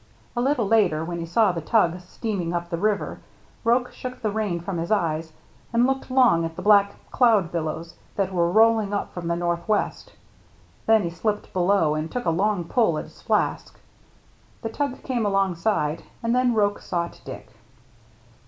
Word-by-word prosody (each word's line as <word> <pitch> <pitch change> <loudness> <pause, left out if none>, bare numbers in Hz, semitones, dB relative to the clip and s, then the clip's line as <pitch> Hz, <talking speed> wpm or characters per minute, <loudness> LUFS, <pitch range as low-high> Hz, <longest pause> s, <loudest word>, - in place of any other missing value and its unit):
A 240 - 0
little 255 -4 +1
later, 185 -8 +3
when 170 0 -4
he 165 - -5
saw 210 +4 +3
the 170 -2 -4
tug 180 -1 +2
steaming 180 -1 -4
up 170 +1 -4
the 170 - -1
river, 210 +1 -1 0.4
Roche 245 +2 +2
shook 250 0 -7
the 215 - +1
rain 205 -5 -1
from 175 0 -4
his 170 - -3
eyes 165 -6 0 0.4
and 235 +1 +3
looked 270 +1 -1
long 250 -10 +4
at 165 0 -4
the - - -7
black 200 -1 +5 0.2
cloud 215 -9 +3
billows 165 0 -4 0.2
that 195 -2 -1
were 170 -1 +2
rolling 220 -1 +4
up - - -3
from 175 -2 -5
the 170 - +1
northwest, 175 +5 -1 0.7
then 220 -1 +5
he 170 - -2
slipped 210 +5 -3
below 180 -4 +2
and 155 +1 -3
took 250 - -3
a 165 - +2
strong 195 +1 +1
pull 170 -2 +1
at - - -3
his - - -16
flask. - - -1 0.8
The 225 - -2
tug 275 +2 -3
came 245 -3 -1
along 195 -2 +1
side, 165 -5 0 0.2
and 230 0 +1
then 250 -2 +2
Roche 205 -1 +1
sought 170 -2 -3
Dick. 105 0 -9
195 Hz, 180 wpm, -24 LUFS, 170-225 Hz, 0.8 s, black